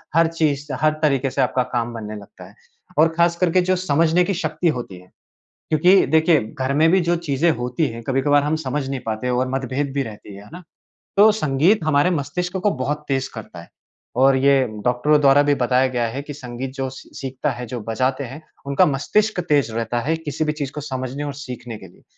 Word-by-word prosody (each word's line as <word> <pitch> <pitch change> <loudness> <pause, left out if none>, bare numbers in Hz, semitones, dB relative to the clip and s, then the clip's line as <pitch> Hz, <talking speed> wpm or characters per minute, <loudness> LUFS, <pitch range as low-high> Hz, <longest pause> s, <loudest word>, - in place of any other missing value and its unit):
हर 165 0 +5
चीज़, 155 -3 -1 0.2
हर 155 0 +3
तरीके 135 -3 +2
से 135 - 0
आपका 125 0 +1
काम 120 0 -1
बनने 110 -2 -6
लगता 100 -3 -12
है। 95 +3 -17 0.4
और 160 - +7
ख़ास 170 0 +3
करके 180 0 +3
जो 185 - +4
समझने 165 0 +2
की 200 - -1
शक्ति 170 0 -2
होती 100 -7 -7
है। 90 - -18 0.6
क्योंकि 180 +5 +5
देखिए, 160 0 +4 0.2
घर 130 +1 -1
में 160 +2 +4
भी 190 - +4
जो 175 - +3
चीज़ें 165 -1 +1
होती 125 +5 -1
हैं 115 0 -8
कभी-कभार 140 +2 +2
हम 150 +2 0
समझ 145 -2 -3
नहीं 135 -1 -3
पाते 110 +3 -2
और 125 +1 0
मतभेद 135 +1 -2
भी 140 - +1
रहती 105 -4 -10
है। 100 - -11
है - - -16
ना? 180 +1 -9 0.6
तो 210 +2 +7
संगीत 165 +1 +2
हमारे 145 +3 +3
मस्तिष्क 180 +6 -3
को 200 +2 +1
बहुत 150 +3 -3
तेज़ 135 -1 -1
करता 110 -6 -9
है। - - -16 0.5
और 135 0 +5
ये 135 0 +4 0.2
डॉक्टरों 125 +5 +3
द्वारा 140 0 +6
भी 145 0 +2
बताया 130 +2 +3
गया 120 -2 -1
है 130 +5 -5
कि 145 - -8
संगीत 130 -1 -6
जो 135 -1 -3
सी 130 - -12
सीखता 135 +2 -3
है, 125 -1 -6
जो 120 +1 -5
बजाते 130 +4 0
हैं, 135 +5 -8 0.2
उनका 140 0 +3
मस्तिष्क 205 +9 0
तेज़ 140 -6 +2
रहता 115 +1 -2
है 160 - +3
किसी 155 -1 -3
भी 150 - +1
चीज़ 145 -3 -4
को 150 - -6
समझने 130 0 -4
और 145 - -4
सीखने 125 -5 -7
के 95 - -12
लिए। - - -22
140 Hz, 215 wpm, -21 LUFS, 125-155 Hz, 0.6 s, और